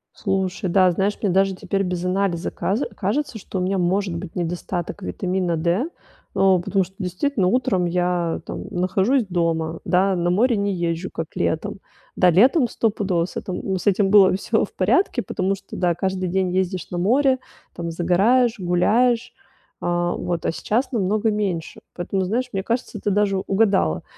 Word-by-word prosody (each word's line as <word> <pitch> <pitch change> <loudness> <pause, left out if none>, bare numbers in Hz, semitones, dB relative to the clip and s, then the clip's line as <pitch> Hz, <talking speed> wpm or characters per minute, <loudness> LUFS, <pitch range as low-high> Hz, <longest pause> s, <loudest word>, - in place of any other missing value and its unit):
Слушай, 190 -1 -1
да. 185 0 +4
Знаешь, 195 +4 0
мне 200 - +1
даже 195 +1 +2
теперь 195 +1 -2
без 180 -2 -3
анализа 185 -2 0
казе 215 +8 -1
кажется, 225 +6 -2
что 190 -1 -5
у - - -1
меня 190 +2 0
может 185 0 0
быть 170 0 -7
недостаток 175 +2 -3
витамина 185 -2 -1
D. 175 - 0 0.5
Ну, 190 -2 +3
потому 190 +1 0
что 190 +2 -19
действительно 190 +4 -1
утром 210 -4 +1
я, 175 -1 0
там, - - -6
нахожусь 195 +8 +1
дома, 165 -2 -1
да, 190 +1 +2
на 175 0 0
море 230 +7 +3
не 200 -1 0
езжу, 170 0 -2
как 165 - -4
летом. 200 +5 -2 0.4
Да, 180 - +5
летом 245 - +5
стопудово 200 -7 0
с - - -11
этом 185 - -4
ну 190 -1 -1
с 185 - -5
этим 200 0 +3
было 195 -2 +6
всё 220 +3 0
в - - -6
порядке, 240 - +2
потому 190 +1 -1
что 195 - -11
да, 175 -2 +1
каждый 190 0 -2
день 190 +1 0
ездишь 185 0 -1
на 175 - -4
море, 260 +8 +3 0.4
там, 170 -1 -4
загораешь, 200 +8 +2
гуляешь. 225 +7 +2 0.5
А, 175 0 0
вот. 175 -2 -3
А - - +2
сейчас 230 +9 -1
намного 215 +1 +1
меньше. 195 -6 -3
Поэтому, 190 +2 -2
знаешь, 230 +8 0
мне 190 -1 -2
кажется, 235 0 -3
ты - - 0
даже 200 -1 +2
угадала. 195 - +1
190 Hz, 175 wpm, -22 LUFS, 175-205 Hz, 0.5 s, было